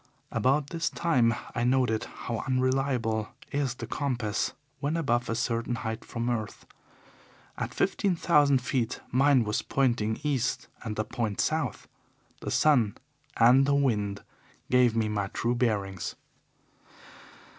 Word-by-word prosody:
About 140 +2 +1
this 165 0 -1
time 125 -9 +2 0.2
I 120 - -1
noted 125 -3 +2
how 115 -2 -5
unreliable 130 -4 +1 0.2
is 140 -3 -1
the 120 - -6
compass 120 -5 -1 0.3
when 145 +4 -1
above 125 -6 0
a 115 - 0
certain 115 0 -1
height 110 0 -4
from 115 0 -4
earth. 115 -3 -3 0.9
At - - -4
fifteen 195 -3 +1
thousand 145 -6 +3
feet 125 -3 -1
mine 135 0 +4
was 105 0 -1
pointing 120 -5 0
east 135 -5 -1 0.2
and 110 -3 -4
a 110 - +1
point 110 -2 -3
south. 155 -5 -1 0.5
The - - -5
sun 125 -9 +3 0.4
and 125 +4 +6
the 140 - +3
wind 105 -8 0 0.5
gave 125 -2 +4
me 110 -1 +1
my 105 -2 -1
true 120 +4 -1
bearings. 100 -7 -1
120 Hz, 135 wpm, -28 LUFS, 110-135 Hz, 0.9 s, and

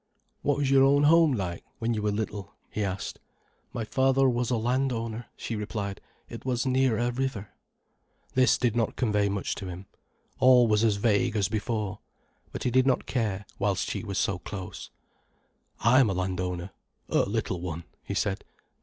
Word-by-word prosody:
"What 145 -1 +1
was 140 -2 +1
your 135 -1 +6
own 140 +1 +5
home 160 0 +6
like, 90 -7 -3
when 115 +1 -1
you 105 - -2
were 105 - +1
little?" 105 -1 -4 0.2
he 105 - -2
asked. 95 -1 -4 0.5
"My 115 - -3
father 135 +3 +3
was 120 -1 0
a 125 - +1
landowner," 120 -1 -1
she 115 - -4
replied. 105 -2 -4 0.3
"It - - -9
was 125 -1 -1
near 130 -3 +2
a 120 +1 +1
river." 120 -5 -3 0.8
This 130 0 +4
did 120 -3 +1
not 115 -2 0
convey 105 -4 +1
much 100 -1 -2
to 95 - -6
him. 90 +2 -7 0.5
All 125 -2 +6
was 105 0 +3
as 110 -3 +3
vague 110 +2 +1
as 100 -2 +1
before. 105 -2 -2 0.5
But - - -5
he 125 - +1
did 130 +2 +4
not 130 - +2
care, 105 -5 -1
whilst 100 -2 0
she - - -3
was 100 -4 -4
so 95 -2 0
close. 90 0 -7 0.9
"I 120 +3 +5
am 125 -6 +5
a - - 0
landowner—a 90 -1 -2 0.5
little 100 -4 -1
one," 85 -2 -4 0.2
he - - -4
said. 95 -1 -1
110 Hz, 175 wpm, -27 LUFS, 100-125 Hz, 0.9 s, your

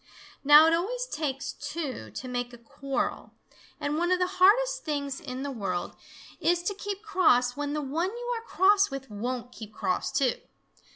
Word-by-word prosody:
Now 295 +2 +9
it 325 - +4
always 470 +9 -1
takes 285 - -3
two 275 - -5
to 255 - -7
make 245 -1 -3
a - - -10
quarrel, 275 +3 -4 0.5
and 295 +2 -1
one 345 +1 +1
of 365 - +4
the 360 - +2 0.2
hardest - - +5
things 280 -3 -3
in 255 +1 -6
the 285 - -3
world 195 -8 -3 0.4
is 345 +1 +1
to 405 - -1
keep 400 0 -6
cross 315 - +3
when 290 0 -3
the 300 0 -2
one 320 +7 -1
you 485 +3 -4
are 455 - -4
cross 400 -2 +3
with 270 -3 -7
won't 245 +3 -4
keep 220 -3 -10
cross, 185 -3 -2
too. 260 -3 +1
290 Hz, 180 wpm, -28 LUFS, 255-370 Hz, 0.5 s, Now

